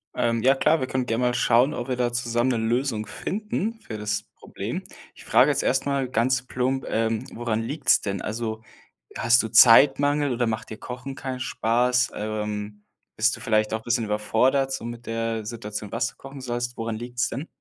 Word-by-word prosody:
Ähm. 115 Hz, -1 st, 0 dB
Ja, 135 Hz, +2 st, +6 dB
klar. 155 Hz, +4 st, +3 dB
Wir 130 Hz, -, -2 dB
können 130 Hz, -1 st, -1 dB
gerne 115 Hz, +2 st, 0 dB
mal 125 Hz, 0 st, +2 dB
schauen, 125 Hz, +3 st, +3 dB
ob 120 Hz, -2 st, -4 dB
wir 130 Hz, -, -1 dB
da 120 Hz, -1 st, 0 dB
zusammen 120 Hz, +1 st, 0 dB
'ne 120 Hz, -, 0 dB
Lösung 115 Hz, -1 st, -1 dB
finden, 215 Hz, -, -3 dB
für 110 Hz, -, -7 dB
das 105 Hz, 0 st, -2 dB
Problem. -, -, -6 dB, 0.3 s
Ich -, -, -14 dB
frage -, -, +5 dB
jetzt -, -, +1 dB
erstmal 135 Hz, 0 st, +1 dB
ganz 130 Hz, +1 st, +1 dB
plump, 130 Hz, +1 st, -1 dB
ähm, 115 Hz, -1 st, 0 dB
woran 115 Hz, -2 st, -1 dB
liegt's 145 Hz, +7 st, +2 dB
denn? 100 Hz, -2 st, -3 dB
Also, 110 Hz, 0 st, -4 dB, 0.6 s
hast 120 Hz, +1 st, +4 dB
du 110 Hz, -, -4 dB
Zeitmangel 145 Hz, +4 st, +6 dB
oder 120 Hz, 0 st, 0 dB
macht 110 Hz, 0 st, -3 dB
dir 110 Hz, -, -7 dB
Kochen 125 Hz, +2 st, -7 dB
keinen 130 Hz, -1 st, -5 dB
Spaß? 125 Hz, +1 st, +1 dB
Ähm, 105 Hz, -1 st, -4 dB, 0.3 s
bist 115 Hz, +2 st, +2 dB
du -, -, -13 dB
vielleicht 110 Hz, -1 st, +1 dB
auch 110 Hz, -, -1 dB
'n -, -, -20 dB
bisschen 120 Hz, -1 st, +1 dB
überfordert 120 Hz, +6 st, +1 dB
so 135 Hz, -, -4 dB
mit 120 Hz, 0 st, -7 dB
der 115 Hz, -1 st, -2 dB
Situation, 105 Hz, -2 st, -6 dB
was 115 Hz, +3 st, 0 dB
du -, -, -13 dB
kochen 135 Hz, 0 st, -10 dB
sollst? 120 Hz, -1 st, -3 dB
Woran 115 Hz, -1 st, -3 dB
liegt's 120 Hz, +1 st, -2 dB
denn? 140 Hz, +8 st, -5 dB
120 Hz, 195 wpm, -25 LUFS, 110-130 Hz, 0.6 s, Ja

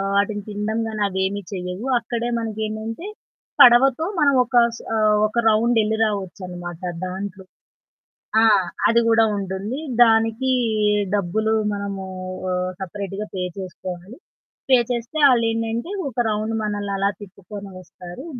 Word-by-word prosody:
వాటిని 205 Hz, +1 st, +1 dB
తినడం 210 Hz, +2 st, -2 dB
గాని 215 Hz, -1 st, -3 dB
అవేమి 190 Hz, +1 st, -1 dB
చెయ్యవు. 180 Hz, +3 st, -5 dB
అక్కడే 235 Hz, 0 st, -3 dB
మనకు 220 Hz, -2 st, -4 dB
ఏంటంటే 220 Hz, -, -5 dB, 0.5 s
పడవతో 250 Hz, +5 st, +7 dB
మనం 285 Hz, -2 st, +4 dB
ఒక 245 Hz, 0 st, -3 dB, 0.2 s
స్ -, -, -12 dB
ఆహ్, 215 Hz, -1 st, +3 dB
ఒక 215 Hz, -, -8 dB
రౌండ్ 225 Hz, +2 st, +3 dB
ఎళ్లి 215 Hz, +1 st, 0 dB
రావచ్చనమాట 180 Hz, -4 st, -5 dB, 0.2 s
దాంట్లో. 190 Hz, +1 st, -6 dB, 1.0 s
ఆ! -, -, +5 dB, 0.4 s
అది 235 Hz, +1 st, +4 dB
గూడా 225 Hz, 0 st, +5 dB
ఉంటుంది. 195 Hz, +6 st, -4 dB, 0.2 s
దానికి 225 Hz, +3 st, +2 dB, 0.6 s
డబ్బులు 215 Hz, +4 st, 0 dB, 0.2 s
మనము 200 Hz, -1 st, -4 dB, 0.5 s
ఆహ్, 180 Hz, 0 st, -1 dB
సెపరేట్‌గా 200 Hz, +2 st, -5 dB
పే 185 Hz, -, -2 dB, 0.2 s
చేసుకోవాలి. 185 Hz, +3 st, -7 dB, 0.5 s
పే 260 Hz, -, +7 dB
చేస్తే 240 Hz, +5 st, -3 dB
ఆళ్ళేంటంటే, 230 Hz, -, 0 dB, 0.2 s
ఒక 240 Hz, -, -16 dB
రౌండ్ 215 Hz, +1 st, -1 dB
మనల్ని 205 Hz, -1 st, -2 dB
అలా 200 Hz, +1 st, +1 dB
తిప్పుకొని 200 Hz, +1 st, -10 dB
వస్తారు 180 Hz, -, -11 dB
210 Hz, 125 wpm, -22 LUFS, 190-225 Hz, 1.0 s, పడవతో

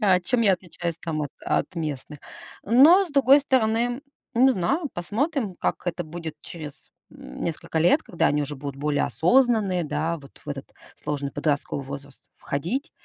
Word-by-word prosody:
А 190 Hz, -4 st, +4 dB
чем 235 Hz, +7 st, 0 dB
я 200 Hz, -3 st, +5 dB
отличаюсь 175 Hz, -2 st, -4 dB
там 155 Hz, -3 st, -3 dB
от 145 Hz, -, -4 dB
от -, -, -1 dB
местных? 150 Hz, -2 st, -4 dB, 0.5 s
Но 295 Hz, -, +7 dB
с 345 Hz, -, -11 dB
другой 275 Hz, 0 st, +6 dB
стороны, 240 Hz, -2 st, +1 dB, 0.3 s
не 255 Hz, +3 st, +6 dB
знаю, 265 Hz, -, 0 dB
посмотрим, 220 Hz, -, -2 dB
как -, -, -2 dB
это 175 Hz, 0 st, -2 dB
будет 160 Hz, 0 st, -7 dB
через, 155 Hz, -4 st, -10 dB, 0.2 s
м, -, -, -9 dB
несколько 160 Hz, 0 st, -3 dB
лет, 180 Hz, -, +4 dB
когда 175 Hz, -, 0 dB
они 150 Hz, 0 st, +2 dB
уже 145 Hz, +1 st, -4 dB
будут 140 Hz, 0 st, -6 dB
более 145 Hz, +1 st, 0 dB
осознанные, 210 Hz, -3 st, +2 dB
да, 155 Hz, +3 st, -1 dB
вот 140 Hz, -3 st, -15 dB
в -, -, -12 dB
этот 140 Hz, -1 st, -6 dB, 0.2 s
сложный 145 Hz, -2 st, -3 dB
подростковый 145 Hz, -2 st, -1 dB
возраст 140 Hz, 0 st, -10 dB
входить. 220 Hz, -, -3 dB
175 Hz, 165 wpm, -25 LUFS, 150-240 Hz, 0.5 s, Но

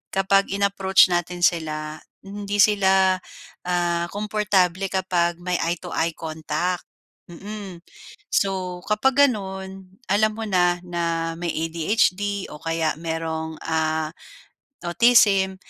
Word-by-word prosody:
kapag 195 Hz, +1 st, +3 dB
in-approach 195 Hz, -2 st, +3 dB
natin 175 Hz, 0 st, -2 dB
sila, 155 Hz, -2 st, 0 dB, 0.2 s
hindi 200 Hz, +1 st, -5 dB
sila 190 Hz, -2 st, +3 dB, 0.5 s
ah, 175 Hz, -1 st, 0 dB
komportable 200 Hz, -3 st, +1 dB
kapag 175 Hz, -2 st, 0 dB
may 180 Hz, -1 st, -1 dB
eye 170 Hz, +1 st, 0 dB
to -, -, -9 dB
eye 165 Hz, 0 st, -1 dB
contact, 160 Hz, +2 st, -3 dB, 0.5 s
mm. 195 Hz, -1 st, -8 dB, 0.5 s
So 185 Hz, -2 st, -1 dB
kapag 265 Hz, +6 st, +4 dB
gano'n, 190 Hz, -2 st, -6 dB
alam 215 Hz, +2 st, +3 dB
mo 225 Hz, 0 st, -5 dB
na, 175 Hz, -2 st, +2 dB
na 165 Hz, -1 st, -2 dB
may 170 Hz, 0 st, -3 dB, 0.2 s
ADHD 200 Hz, +3 st, 0 dB
o 150 Hz, -, -9 dB
kaya 165 Hz, -1 st, 0 dB
mayroong, 160 Hz, -1 st, -4 dB
ah, 160 Hz, -1 st, -1 dB, 0.7 s
autism, 195 Hz, -1 st, +4 dB
185 Hz, 110 wpm, -23 LUFS, 165-200 Hz, 0.7 s, kapag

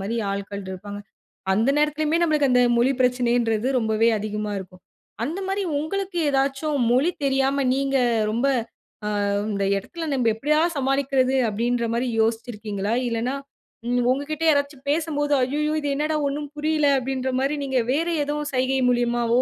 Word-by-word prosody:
மாரி 210 Hz, +4 st, -3 dB
ஆள்க்கள் 200 Hz, 0 st, -4 dB
இருப்பாங்க. 205 Hz, +2 st, -7 dB, 0.5 s
அந்த 225 Hz, +7 st, +2 dB
நேரத்திலுமே 300 Hz, +1 st, +1 dB
நம்மளுக்கு 305 Hz, -4 st, +2 dB
அந்த 250 Hz, 0 st, +4 dB, 0.2 s
மொழி 250 Hz, +3 st, +3 dB
பிரச்சனைன்றது 245 Hz, -2 st, +1 dB
ரொம்பவே 220 Hz, 0 st, +2 dB
அதிகமா 210 Hz, 0 st, -3 dB
இருக்கும். 185 Hz, -1 st, -11 dB, 0.4 s
அந்த 330 Hz, +9 st, -3 dB
மாரி 390 Hz, +1 st, -1 dB, 0.2 s
உங்களுக்கு 380 Hz, +4 st, -3 dB
ஏதாச்சும் 275 Hz, +2 st, 0 dB
மொழி 280 Hz, +8 st, +3 dB
தெரியாம 270 Hz, 0 st, +1 dB
நீங்க 275 Hz, 0 st, 0 dB, 0.3 s
ரொம்ப, 235 Hz, +5 st, 0 dB, 0.8 s
"ஆ -, -, 0 dB, 0.2 s
இந்த 200 Hz, -1 st, -1 dB
இடத்தில 325 Hz, -, -6 dB
நம்ப 250 Hz, -4 st, +1 dB
எப்படியா 300 Hz, +6 st, +1 dB, 0.2 s
சமாளிக்கிறது?" 270 Hz, -1 st, +1 dB
அப்படீன்ற 235 Hz, +2 st, 0 dB
மாரி 240 Hz, +2 st, 0 dB
யோசிச்சு 225 Hz, +2 st, 0 dB
இருக்கீங்களா? 210 Hz, 0 st, -3 dB
இல்லன்னா, 235 Hz, +3 st, -1 dB, 0.5 s
ம் 245 Hz, 0 st, +2 dB
உங்கக்கிட்ட 305 Hz, +4 st, -2 dB
யாராச்சும் 285 Hz, -2 st, 0 dB
பேசம்போது, 295 Hz, -2 st, 0 dB
"அய்யய்யோ! 300 Hz, +4 st, 0 dB
இது 290 Hz, -, -2 dB
என்னடா 305 Hz, +2 st, 0 dB
ஒண்ணும் 290 Hz, +1 st, -4 dB
புரியல." 305 Hz, -1 st, +1 dB
அப்படீன்ற 260 Hz, 0 st, -2 dB
மாரி 280 Hz, +2 st, 0 dB
நீங்க 265 Hz, -2 st, +1 dB
வேற 325 Hz, +4 st, 0 dB, 0.2 s
எதுவும் 295 Hz, 0 st, -3 dB
சைகை 260 Hz, +1 st, +1 dB
மூலியமாவோ, 240 Hz, 0 st, +2 dB
265 Hz, 145 wpm, -23 LUFS, 235-295 Hz, 0.8 s, அந்த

